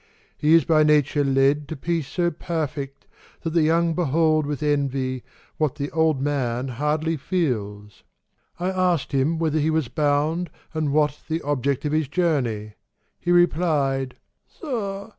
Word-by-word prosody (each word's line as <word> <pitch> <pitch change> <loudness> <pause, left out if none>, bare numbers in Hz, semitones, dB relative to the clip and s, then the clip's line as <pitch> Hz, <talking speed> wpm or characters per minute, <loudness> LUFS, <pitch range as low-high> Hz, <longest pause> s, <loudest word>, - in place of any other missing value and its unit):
He 155 +2 +4
is 165 -5 +4
by 155 -2 +4
nature 150 -1 +3
led 140 +2 +2
To 160 - -5
peace 165 0 -2
so 175 +4 0
perfect, 150 -4 -4 0.4
that 165 - -2
the 165 0 +3
young 165 +2 +2
behold 155 -2 +2
With 150 0 -3
envy, 135 -3 0 0.4
what 150 -3 0
the 145 -1 -4
old 160 -3 +2
man 130 -3 -1
hardly 150 +5 -1
feels. 105 - -3 0.6
—I 180 +2 0
asked 180 -5 0
him 140 +4 +1
whither 160 -1 0
he 155 +1 +1
was 160 -6 0
bound, 150 +3 0 0.2
and 155 -2 -1
what 150 0 +1
The 160 +1 -2
object 140 -1 -1
of 150 - 0
his 155 -1 +1
journey; 130 -11 -1 0.5
he 175 - -1
replied 150 -7 +2 0.3
"Sir! 210 - -5
150 Hz, 150 wpm, -23 LUFS, 135-165 Hz, 0.6 s, He